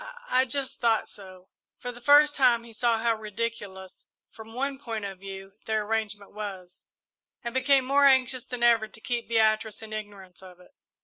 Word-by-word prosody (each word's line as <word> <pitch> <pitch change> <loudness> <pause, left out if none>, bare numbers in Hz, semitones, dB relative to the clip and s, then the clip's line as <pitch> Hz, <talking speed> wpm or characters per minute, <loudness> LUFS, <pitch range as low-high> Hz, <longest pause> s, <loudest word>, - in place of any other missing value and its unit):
"I 255 - +4
I 260 - +4
just 270 +1 -2
thought 230 -2 +2
so." 185 -2 -12 0.3
For 245 - -6
the 240 0 -13
first 290 +3 +6
time 245 -4 +4
he 230 -1 -13
saw 235 0 +1
how 230 +1 +1
ridiculous, 210 -3 -6 0.2
from 225 0 -12
one 275 +1 -2
point 225 -6 -5
of 195 -2 -7
view, 195 0 -9
their 220 -1 0
arrangement 210 -2 -3
was, 190 -4 -7 0.6
and 235 0 -4
became 260 0 +3
more 280 +2 +4
anxious 260 -2 +3
than 250 -1 -4
ever 230 -2 +4
to 220 - -12
keep 240 +1 -3
Beatrice 220 -1 +1
in 215 0 -8
ignorance 200 -4 -8
of 180 -1 -14
it. 180 - -19
225 Hz, 185 wpm, -27 LUFS, 205-250 Hz, 0.6 s, first